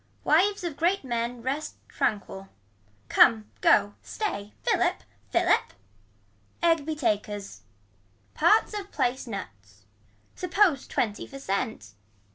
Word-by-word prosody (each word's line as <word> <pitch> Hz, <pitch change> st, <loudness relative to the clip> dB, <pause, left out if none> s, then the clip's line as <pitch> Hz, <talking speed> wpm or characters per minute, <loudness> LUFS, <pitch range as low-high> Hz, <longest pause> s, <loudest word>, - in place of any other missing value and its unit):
Wives 380 Hz, +6 st, +3 dB
of 335 Hz, -5 st, -4 dB
great 355 Hz, +3 st, +1 dB
men 235 Hz, -1 st, -3 dB
rest 280 Hz, +4 st, -3 dB
tranquil. 195 Hz, -2 st, -2 dB, 0.6 s
Come 215 Hz, -2 st, +4 dB
go 205 Hz, 0 st, +4 dB
stay 210 Hz, -, -4 dB
philip -, -, +1 dB, 0.3 s
philip. -, -, +2 dB, 0.9 s
Egg 330 Hz, -3 st, +3 dB
be 315 Hz, -, -1 dB
takers. 210 Hz, -6 st, -2 dB, 0.7 s
Parts 435 Hz, 0 st, +3 dB
of 405 Hz, -1 st, -6 dB
place 250 Hz, +1 st, -1 dB
nuts. 100 Hz, -, -9 dB, 0.5 s
Suppose 360 Hz, -5 st, +2 dB
twenty 210 Hz, -2 st, -2 dB
for 275 Hz, -, -10 dB
cent. 200 Hz, -, -3 dB
245 Hz, 105 wpm, -27 LUFS, 205-330 Hz, 0.9 s, Come